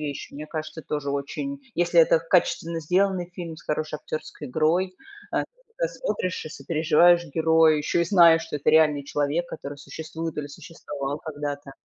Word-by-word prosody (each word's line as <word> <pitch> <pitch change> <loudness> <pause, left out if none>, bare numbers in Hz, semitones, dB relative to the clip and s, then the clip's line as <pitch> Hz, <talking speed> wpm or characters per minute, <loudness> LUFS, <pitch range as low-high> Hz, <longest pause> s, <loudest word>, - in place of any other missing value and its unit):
вещи. 145 -2 -5
Мне 150 +2 -7
кажется, 155 0 -6
тоже 145 -2 -3
очень 205 - -4
если 175 0 +4
это 160 0 +5
качественно 165 -1 +1
сделанный 180 +2 +1
фильм 165 -3 -6
с - - -14
хорошей 155 0 -2
актерской 155 -1 -7
игрой. 165 +6 +1 0.4
Э, - - +1
ты - - 0 0.3
тогда - - +1
смотришь 185 - -3
и - - -7
сопереживаешь 165 +4 +3
герою, 160 -1 +4
ещё 150 +3 0
и 170 - +3
знаешь, 170 -3 +6
что 160 -2 -4
это 145 - +2
реальный 155 -2 +4
человек, 145 +5 -1
который 140 0 -7
существует 160 +3 -6
или 145 - -3
существовал 145 -2 -6
когда-то. 145 -2 -6
160 Hz, 165 wpm, -25 LUFS, 150-170 Hz, 0.4 s, знаешь